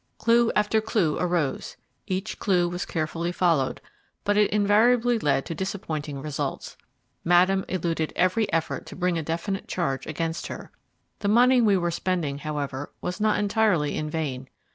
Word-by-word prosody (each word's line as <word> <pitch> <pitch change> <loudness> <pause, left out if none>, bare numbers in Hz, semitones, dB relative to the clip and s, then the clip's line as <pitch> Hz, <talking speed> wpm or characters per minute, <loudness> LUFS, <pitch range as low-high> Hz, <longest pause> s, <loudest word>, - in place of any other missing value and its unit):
Clue 235 0 +3
after 210 +1 +2
clue 210 -8 0
arose: 175 -6 -1 0.3
each 190 +3 -3
clue 180 -3 +2
was 175 +1 -4
carefully 165 +1 -2
followed, 165 -7 +1 0.4
but 205 0 +1
it 210 0 +4
invariably 225 +4 +3
led 140 -6 +1
to - - -4
disappointing 155 -5 -4
results. 150 -2 -4 0.5
Madame 185 +3 +4
eluded 165 -3 -1
every 200 +4 +1
effort 165 -1 -2
to - - -9
bring 180 -2 0
a - - -2
definite 170 +5 -3
charge 135 -7 -2
against 165 +1 -3
her. - - -8 0.5
The 205 - -2
money 245 +4 +5
we 205 -4 +4
were 175 -1 0
spending, 170 -5 -2
however, 145 -2 -4
was 180 +4 -4
not 215 0 +3
entirely 205 -8 +1
in 155 0 -3
vain. 135 -5 -4
175 Hz, 155 wpm, -25 LUFS, 155-205 Hz, 0.5 s, money